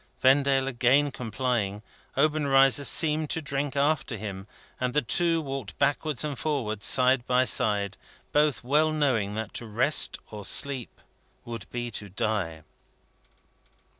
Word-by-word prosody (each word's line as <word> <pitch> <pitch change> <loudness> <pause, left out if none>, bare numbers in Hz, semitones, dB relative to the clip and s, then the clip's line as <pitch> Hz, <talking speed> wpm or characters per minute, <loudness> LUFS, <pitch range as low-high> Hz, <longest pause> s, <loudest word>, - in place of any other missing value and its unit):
Vendale 135 0 +3
again 135 +3 +2
complying, 115 -4 -3 0.3
Obenreizer 140 -2 +3
seemed 155 +1 +3
to - - 0
drink 140 -1 -3
after 140 -4 0
him, 100 -2 -7 0.3
and 125 -1 -2
the 150 - +2
two 165 +7 +2
walked 135 -8 -6
backwards 145 0 0
and 145 -5 -4
forwards 115 -9 -1
side 130 -1 +4
by 125 0 +3
side; 100 -6 +1 0.3
both 150 -4 +1
well 150 +5 +2
knowing 125 -10 0
that 110 -1 -5
to 120 - -3
rest 120 +8 +2
or 105 -1 -8
sleep 135 +4 0 0.4
would 115 -1 -8
be 120 -1 -5
to 105 -1 -6
die. 95 -6 -3
130 Hz, 135 wpm, -26 LUFS, 110-145 Hz, 0.4 s, side